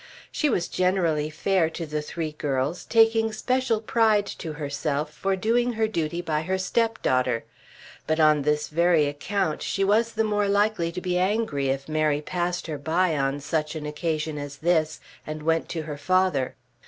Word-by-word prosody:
She 300 - +1
was 180 -8 0
generally 170 -5 +1
fair 165 +1 +1
to 165 +1 -5
the 150 0 -3
three 155 +1 -4
girls, 145 +2 -2
taking 225 -1 +4
special 250 +1 0
pride 215 -2 +2
to 160 -2 -5
herself 145 0 -3
for 195 0 -1
doing 240 +5 +1
her 220 -1 +1
duty 170 -4 -2
by 155 -2 0
her 185 +4 -1
stepdaughter; 160 - 0 0.6
but 155 +1 +1
on 155 -1 +5
this 150 +1 0
very 170 -1 +3
account 155 +3 -2
she 195 - -1
was 225 +4 +2
the 220 - +1
more 210 -1 +1
likely 200 -4 +1
to 180 +2 -5
be 180 0 0
angry 185 -8 0
if 135 +1 -2
Mary 155 -1 +1
passed 175 +3 -2
her 155 -3 -4
by 165 +3 +1
on 135 0 0
such 155 +1 -2
an 155 -1 -5
occasion 155 0 -2
as 145 0 -6
this 160 -1 +1 0.3
and 155 0 -5
went 165 +1 +1
to 165 -2 -3
her 150 -2 -6
father. 185 -5 +1
165 Hz, 175 wpm, -25 LUFS, 150-200 Hz, 0.6 s, on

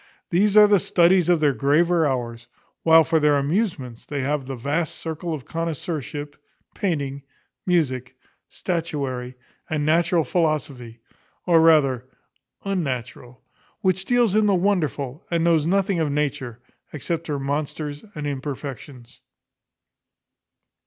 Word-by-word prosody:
These 200 +4 +3
are 210 - +10
the 205 -1 +4
studies 175 0 +3
of 175 -2 +4
their 145 -2 +3
graver 160 +4 +2
hours, 120 -3 -4 0.3
while 160 0 +6
for 160 +1 +1
their 150 -1 +3
amusements 140 - -2
they 145 -2 -4
have 140 0 -2
the 135 - -4
vast 145 +6 -2
circle 165 +1 -5
of 150 -5 -5
connoisseurship, 150 - -4 0.4
painting, 140 -7 -2 0.5
music, 130 -8 0 0.3
statuary, 140 -8 -3 0.3
and 150 -2 -1
natural 165 +2 +2
philosophy, 140 -7 -2 0.4
or 170 -2 +5
rather 140 -6 +4 0.6
unnatural, 130 - -4 0.4
which 190 0 0
deals 240 -4 +2
in 215 0 +3
the 200 - +3
wonderful, 155 -7 -1
and 170 -1 0
knows 165 -2 +3
nothing 195 0 +1
of 155 -3 0
Nature, 130 -5 -3 0.3
except 160 +3 -4
her 150 -2 -2
monsters 145 +1 -4
and 150 -1 -5
imperfections. 135 -2 -7
150 Hz, 125 wpm, -23 LUFS, 135-170 Hz, 0.6 s, are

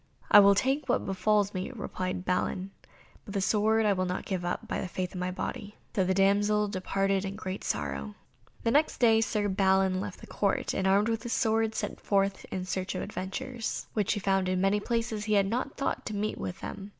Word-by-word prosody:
"I 210 - +11
will 200 0 +7
take 270 +6 0
what 245 - +1
befalls 205 +1 +1
me," 185 +3 -3
replied 185 -4 -4
Balin, 185 +1 -1 0.5
"but 200 - -9
the - - +2
sword 220 +3 +2
I 205 - +4
will 185 -1 -1
not 180 - -3
give 185 -3 -2
up, 175 0 -3
by - - -2
the - - -3
faith 180 0 -4
of 185 - -5
my 180 0 -1
body." 205 +3 -5 0.2
So 190 - +3
the 185 +1 +1
damsel 205 +2 +3
departed 195 0 0
in 195 0 -4
great 190 -2 -5
sorrow. 70 -1 -3 0.5
The 230 - +2
next 300 +4 +2
day 225 -2 +5
Sir 210 -2 0
Balin 190 -1 +2
left 200 -2 -6
the - - -11
Court, 200 -2 -1
and, 190 - 0
armed 200 +3 +4
with 225 -1 -1
his 240 - -3
sword, 225 -1 +1
set - - -4
forth 195 -1 +1
in 185 -1 -3
search 185 0 -3
of - - -2
adventures, 220 +5 -4
which 210 -4 +1
he 210 - -2
found 195 -1 +1
in 185 0 +1
many 195 +2 +2
places 230 -1 -2
where 210 - -6
he 215 - +2
had 200 -1 +4
not 245 +7 -2
thought 275 - -1
to 215 - -4
meet 210 +1 -2
with 180 - -5
them. 195 0 -6
200 Hz, 220 wpm, -29 LUFS, 190-215 Hz, 0.5 s, I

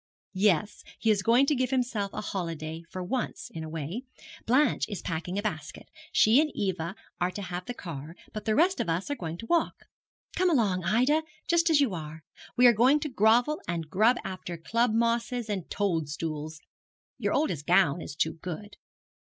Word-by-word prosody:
'Yes, 200 0 +2 0.2
he 225 - +2
is 205 -2 +2
going 235 +7 +4
to 295 - +2
give 255 -2 0
himself 240 -6 -1
a - - -4
holiday, 165 -5 -4
for 185 -1 -5
once 245 +7 -3
in 160 - -5
a 160 - -6
way. 165 - -4 0.5
Blanche 265 +6 +3
is 205 - -4
packing 170 +3 -3
a 205 - -1
basket. 155 -8 -5 0.2
She 225 +7 +5
and 310 - 0
Eva 185 -2 -2 0.2
are 180 - +1
to 205 - -6
have 180 0 -5
the 245 - -4
car, 160 - -7 0.2
but 215 - -6
the 215 -1 +2
rest 360 +6 +3
of - - -1
us 175 +11 -1
are - - 0
going 165 - -5
to 230 - -8
walk. 340 +6 0 0.5
Come 370 0 +3
along, 205 - +2
Ida, 250 - +3 0.3
just 335 0 +3
as 305 -3 +5
you 255 -8 +2
are. 155 -1 -7 0.3
We 250 - +6
are 240 - +8
going 255 +7 +4
to 300 - -2
grovel 245 +5 +3
and 165 -2 -3
grub 220 +7 +4
after 185 -2 -6
club 230 +8 +1
mosses 230 0 0
and 190 -5 -4
toad 170 -7 -1
stools. 155 0 -4 0.6
Your - - 0
oldest 170 - 0
gown 175 -3 +4
is 145 - -7
too 160 - 0
good.' 195 +4 -7
200 Hz, 195 wpm, -28 LUFS, 165-245 Hz, 0.6 s, are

